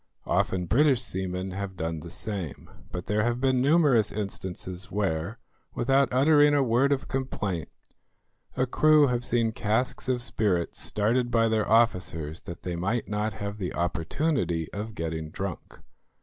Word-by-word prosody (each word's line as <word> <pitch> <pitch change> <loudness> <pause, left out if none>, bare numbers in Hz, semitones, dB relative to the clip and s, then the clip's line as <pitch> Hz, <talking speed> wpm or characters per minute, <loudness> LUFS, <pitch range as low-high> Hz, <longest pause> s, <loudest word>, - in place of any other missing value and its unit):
Often 95 -1 0
British 135 - +4
seamen 95 -1 -2
have 95 0 -5
done 80 0 -3
the 85 - -9
same, 95 -4 -6 0.2
but 90 - -5
there 105 +1 +1
have 120 +2 0
been 130 -1 +2
numerous 140 -6 +4
instances 95 -1 -5
where, 100 +1 -1 0.4
without 135 +2 +2
uttering 145 +2 +5
a 140 - +4
word 125 +3 +2
of 135 -2 0
complaint, 105 -10 -3 0.9
a 130 - +3
crew 150 +3 +5
have 125 -2 0
seen 115 -2 +1
casks 110 +4 -1
of 125 -2 +1
spirits 95 -8 -1
started 120 +4 +1
by 115 -1 +3
their 110 -1 0
officers 90 -8 +1
that 85 0 -9
they 90 -1 -3
might 100 +8 -1
not 105 +1 -1
have 100 +1 -5
the 90 -3 -3
opportunity 85 - -1
of 105 +2 -5
getting 80 -2 -4
drunk. 95 +1 -6
105 Hz, 150 wpm, -27 LUFS, 90-125 Hz, 0.9 s, uttering